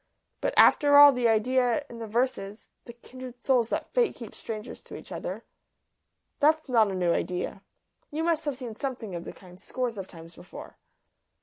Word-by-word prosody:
"But, - - -1
after 285 -1 +6
all, 290 0 +10
the 250 -3 +1
idea 245 +4 +1
in 235 -3 -11
the 225 - -6
verses 220 -3 -2 0.2
the 235 - -10
kindred 250 +1 -11
souls 245 -3 +1
that - - -4
Fate 485 -4 +2
keeps 230 -4 -10
strangers 220 +1 -7
to - - -10
each - - -11
other - - -5 1.0
that's 310 +1 +3
not 225 -5 +3
a 190 - -3
new 175 -2 +1
idea. 180 +1 -3 0.5
You 310 +2 -3
must 325 -1 0
have 290 -3 -2
seen 245 -4 -7
something 245 -6 -5
of 170 -1 -6
the - - -6
kind 180 -1 -16
scores 245 -5 -4
of 190 - -6
times 165 -1 -13
before." 175 +2 -12
240 Hz, 185 wpm, -27 LUFS, 210-265 Hz, 1.0 s, all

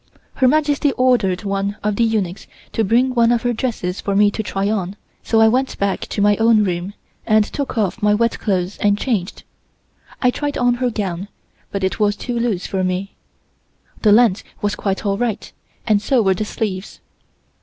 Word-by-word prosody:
Her 260 - +2
Majesty 290 0 +2
ordered 230 -8 +2
one 200 +1 -2
of 210 0 0
the 235 - +2
eunuchs 205 -5 -1 0.2
to 225 - 0
bring 245 +5 +2
one 235 -1 +3
of 240 -1 +1
her 245 0 +1
dresses 220 -6 -3
for 200 - -2
me 205 0 +4
to 220 - -3
try 195 -2 -2
on, 200 -3 -2 0.3
so 225 - +1
I 225 - +6
went 255 +4 0
back 200 -1 -1
to 200 - -1
my 205 0 +4
own 225 -1 +4
room, 185 +1 -3 0.3
and 215 -1 +4
took 275 +1 -5
off 215 +1 -1
my 210 0 +3
wet 230 +2 0
clothes 190 -2 -1
and 205 0 +2
changed. 210 -6 -2 0.8
I 250 -2 +3
tried 290 +2 -3
on 245 0 +3
her 250 - +2
gown, 195 -4 -3 0.4
but 200 -1 -3
it 190 - -1
was 205 -1 +2
too 245 - -5
loose 225 -6 -1
for 190 -1 -2
me. 185 +2 -2 0.9
The 215 - +4
length 220 -2 +5 0.2
was 205 -1 -1
quite 195 +1 -3
all 200 0 0
right 240 -4 -2 0.3
and 210 -2 +2
so 240 +2 +2
were 190 -1 +3
the 210 +3 -3
sleeves. 200 -3 -4
210 Hz, 195 wpm, -19 LUFS, 195-235 Hz, 0.9 s, I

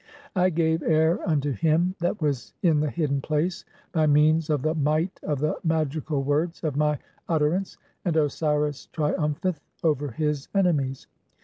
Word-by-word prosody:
I 185 0 +4
gave 160 -1 +1
air 160 +2 +3
unto 145 -2 +1
him 165 - +2
"that 175 +4 -1
was 140 -5 -2
in 160 -4 +4
the 150 0 +1
hidden 140 +1 -1
place 155 +5 -1 0.3
by 155 -2 +2
means 155 +2 +4
of 145 -4 +1
the 155 - +1
might 155 +4 0
of 150 - -1
the 150 +3 -1
"magical 155 -3 0
words 155 +6 -1
of 155 -4 -1
my 150 0 +2 0.3
utterance, 165 +4 0 0.3
and 170 -4 0
Osiris 150 -1 0
triumpheth 155 +2 -1 0.2
over 150 -3 +1
his 150 +2 -2
"enemies. 145 -9 +1
155 Hz, 150 wpm, -25 LUFS, 145-165 Hz, 0.3 s, I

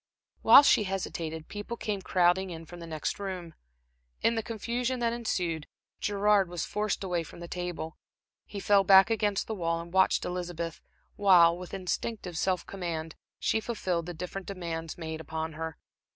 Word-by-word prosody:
While 280 - +9
she 215 - +5
hesitated, 165 -4 -4
people 205 +3 -6
came 205 -3 -3
crowding 185 +1 +2
in 165 -1 -7
from 175 +2 -11
the 170 - -8
next 155 +3 -3
room. 185 -4 -5 0.7
In 230 - +4
the 225 - 0
confusion 240 +3 -2
that 235 -1 +1
ensued, 175 -9 -2 0.3
Gerard 205 -2 +3
was 175 -2 -3
forced 210 -1 -1
away 180 -3 0
from 165 - -11
the 170 - -7
table. 175 -2 -5 0.5
He 205 - -6
fell 200 0 +4
back 195 +2 +7
against 210 -3 +1
the 220 - -4
wall, 165 -4 -1
and 170 +1 -9
watched 190 0 +3
Elizabeth 175 -2 -4 0.4
while, 180 -4 +6
with 180 0 -9
instinctive 185 0 -3
self 180 +2 0
command, 165 -4 -4 0.2
she 225 - +1
fulfilled 185 -7 -2
the 175 - -5
different 180 +3 -6
demands 165 -4 -5
made 160 -1 -5
upon 160 +1 -4
her. 160 +1 -5
180 Hz, 165 wpm, -29 LUFS, 165-205 Hz, 0.7 s, While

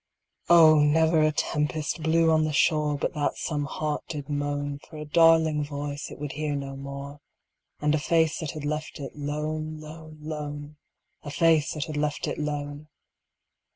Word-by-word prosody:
Oh! 160 -3 +8
never 160 +2 +4
a 155 0 +4
tempest 150 +1 -1
blew 160 +1 +3
on 155 0 +4
the 155 -1 -1
shore 150 0 +2
But - - -2
that 150 -1 -1
some 150 -3 -2
heart 150 +1 -3
did 145 -3 -6
moan 145 0 -2
For 155 - -13
a 150 - -6
darling 160 -1 +4
voice 145 0 -5
it - - -10
would 145 -1 -5
hear 150 0 -2
no 135 -1 -5
more 140 +1 -7 0.6
And 150 0 +2
a 155 - +2
face 160 0 +2
that 160 - -4
had 155 -2 -6
left 150 +1 -3
it 135 -3 -7
lone, 155 +2 -3
lone, 155 0 -11
lone 150 -1 -6 0.4
A 145 - -8
face 160 0 +3
that 150 0 -2
had 155 -2 -5
left 150 0 -1
it - - -3
lone! 145 0 -4
150 Hz, 175 wpm, -26 LUFS, 145-155 Hz, 0.6 s, Oh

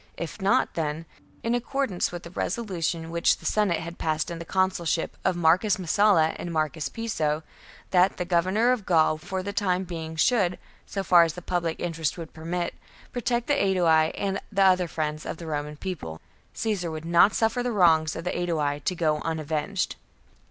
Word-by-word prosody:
If 170 +5 -6
not, 195 +1 +2
then, 160 0 -3 0.4
in 230 - 0
accordance 245 -4 -1
with 175 -1 -7
the 170 - -10
resolution 170 -6 -2
which 170 0 +2
the - - -15
Senate 205 -6 +1
had 170 +1 -8
passed 155 0 -1
in 170 - -5
the 170 - -7
consulship 185 -3 0
of 185 - +1
Marcus 175 +5 +3
Messala 185 -2 +3
and 175 - -5
Marcus 155 -1 -1
Piso 160 -9 -2 0.2
— - - -22
that 185 +1 +4
the 180 - -2
Governor 185 +7 +2
of 250 -5 0
Gaul 155 -3 +3
for 185 +3 -4
the 200 +1 -4
time 190 -3 +1
being 165 -3 -6
should, 185 0 +2 0.3
so 195 - -3
far 175 -2 +6
as 165 -2 +2
the 180 - -8
public 170 -2 -1
interest 165 -2 -2
would 165 -2 -8
permit, 170 +2 -3 0.4
protect 240 0 -1
the 290 - +1
Aedui 170 - +3
and 195 -1 -1
the 195 -1 +3
other 185 -2 +4
friends 155 -1 -3
of - - -5
the 170 - -8
Roman 150 -1 -4
People 145 - -6 0.2
— - - -36
Caesar 210 -6 -1
would 160 0 -6
not 170 +4 +5
suffer 225 +2 +1
the 245 0 -1
wrongs 160 -6 +4
of 165 - -5
the 180 - -2
Aedui 155 -5 -1
to 180 - 0
go 155 -3 +1
unavenged. 160 +4 -2
175 Hz, 190 wpm, -26 LUFS, 160-195 Hz, 0.4 s, far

